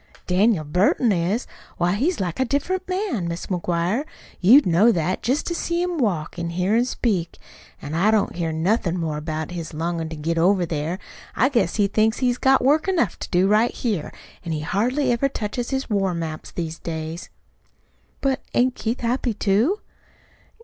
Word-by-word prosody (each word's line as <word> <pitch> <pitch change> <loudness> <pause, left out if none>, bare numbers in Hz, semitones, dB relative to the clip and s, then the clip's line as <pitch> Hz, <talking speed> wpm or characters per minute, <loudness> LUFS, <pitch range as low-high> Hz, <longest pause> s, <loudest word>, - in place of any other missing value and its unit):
"Daniel 190 -1 +2
Burton 185 - +2
is. 190 +6 0 0.3
Why, 175 +1 +1
he's 300 - 0
like 180 +1 -3
a 260 - +3
different 360 +9 -1
man, 365 - -1
Mis' 170 +1 -4
McGuire. 180 +6 -1 0.4
You'd 245 +11 +7
know 185 +7 +5
that, 180 -1 -1
jest 260 +6 0
to 345 - -2
see 340 0 -1
him 355 -2 -2
walk, 180 - -1
an' 170 0 -2
hear 180 +5 0
him 240 +2 +3
speak. 195 -9 -1 0.5
An' 145 - -5
I 180 +6 +3
don't 215 -2 +2
hear 170 -2 -1
nothin' 175 +2 0
more 160 -3 -2
about 155 +1 -4
his 170 -3 -6
longin' 165 0 -2
to 160 - -6
get 165 +2 -1
over 180 +1 +3
there. 160 +2 -2 0.4
I 260 - +3
guess 235 -10 +1
he 205 - +3
thinks 215 +3 +2
he's 250 -1 0
got 265 -1 +4
work 300 +6 +3
enough 335 - +1
to - - -6
do 180 +2 +3
right 215 +4 +4
here. 210 -10 -2 0.3
An' 165 -2 -3
he 155 - -2
hardly 250 - 0
ever 245 +4 +1
touches 235 0 -3
his 265 0 -2
war 195 -5 0
maps 160 -2 -5
these 165 -2 -5
days." 160 +1 -5 0.9
"But 270 -1 0
ain't 250 +1 +3
Keith 235 +1 -3
happy, 240 -1 0
too?" 220 - +1
200 Hz, 185 wpm, -23 LUFS, 170-245 Hz, 0.9 s, You'd